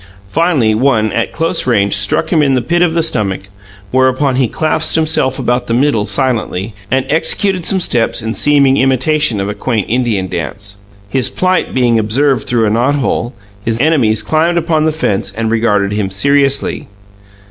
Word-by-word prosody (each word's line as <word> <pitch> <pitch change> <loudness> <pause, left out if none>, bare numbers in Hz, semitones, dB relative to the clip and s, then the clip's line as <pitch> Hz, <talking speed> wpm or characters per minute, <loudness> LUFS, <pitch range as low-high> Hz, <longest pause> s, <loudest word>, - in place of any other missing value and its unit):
Finally, 150 - +1
one, 110 -2 +1
at 115 - -2
close 165 -4 -1
range, 100 -5 +2
struck 100 -1 -1
him 165 -4 +3
in 135 -2 +2
the 125 - +1
pit 175 +8 0
of 170 -2 +2
the 165 - +2
stomach, 100 - -2 0.4
whereupon 130 +1 +1
he 130 -2 +2
clasped 155 +7 +1
himself 155 -5 0
about 125 0 -1
the 115 - 0
middle 120 -5 +1
silently, 115 -6 -2 0.2
and 130 0 0
executed 180 +4 0
some 195 - +2
steps 120 -10 0
in 110 -1 -3
seeming 140 -1 +3
imitation 135 -1 +1
of 100 - -2
a 105 - -3
quaint 110 -2 -2
Indian 115 -6 -1
dance. 100 +4 -6 0.3
His 130 +3 0
plight 185 0 -1
being 120 -3 +2
observed 130 +5 0
through 115 -2 +1
a 105 - 0
knothole, 125 0 0 0.3
his 115 +1 -2
enemies 125 -7 +2
climbed 165 +2 +1
upon 160 -2 0
the 160 - +2
fence 100 -11 -2
and 110 -1 -1
regarded 105 -3 +1
him 105 -2 -2
seriously. 140 +7 0
130 Hz, 170 wpm, -13 LUFS, 110-150 Hz, 0.4 s, him